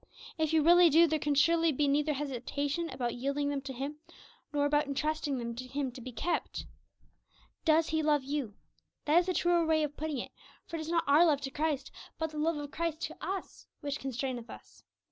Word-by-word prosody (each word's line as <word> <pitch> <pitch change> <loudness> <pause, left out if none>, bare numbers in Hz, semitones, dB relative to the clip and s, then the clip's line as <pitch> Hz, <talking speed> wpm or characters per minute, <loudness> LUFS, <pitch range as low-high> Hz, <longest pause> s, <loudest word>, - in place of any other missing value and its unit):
If 315 -1 +1
you 320 -2 +4
really 345 +1 +7
do, 325 +3 +7
there 315 -1 0
can 290 0 0
surely 330 +3 +4
be 290 +1 +1
neither 295 +2 +2
hesitation 285 +4 -2
about 240 -2 -2
yielding 280 +3 -1
them 285 -1 -2
to 270 0 -6
Him, 275 +4 -5 0.5
nor 290 -1 +1
about 295 0 +2
entrusting 290 0 -1
them 235 -1 -4
to 255 +2 -7
Him 270 0 -2
to 250 - -10
be 255 +2 -7
kept. 330 +9 -2 1.0
Does 320 0 +4
He 315 0 +1
love 300 -2 +2
you? 270 -6 -3 0.5
That 305 +3 +5
is 350 - 0
the 370 - +1
truer 345 -1 +3
way 315 -1 +2
of 295 -1 -3
putting 310 -2 -3
it; 240 - -5 0.3
for 335 - -5
it - - -5
is 315 0 -5
not 335 -1 +2
our 290 +4 +6
love 300 -5 +3
to 270 -1 -4
Christ, 300 -1 -1 0.3
but 320 -1 -2
the 305 - -5
love 320 +1 +1
of 290 -1 -6
Christ 330 0 -2
to - - -4
us 385 0 -5
which 285 -1 -3
constraineth 255 -2 -4
us. - - -13
295 Hz, 215 wpm, -31 LUFS, 275-320 Hz, 1.0 s, really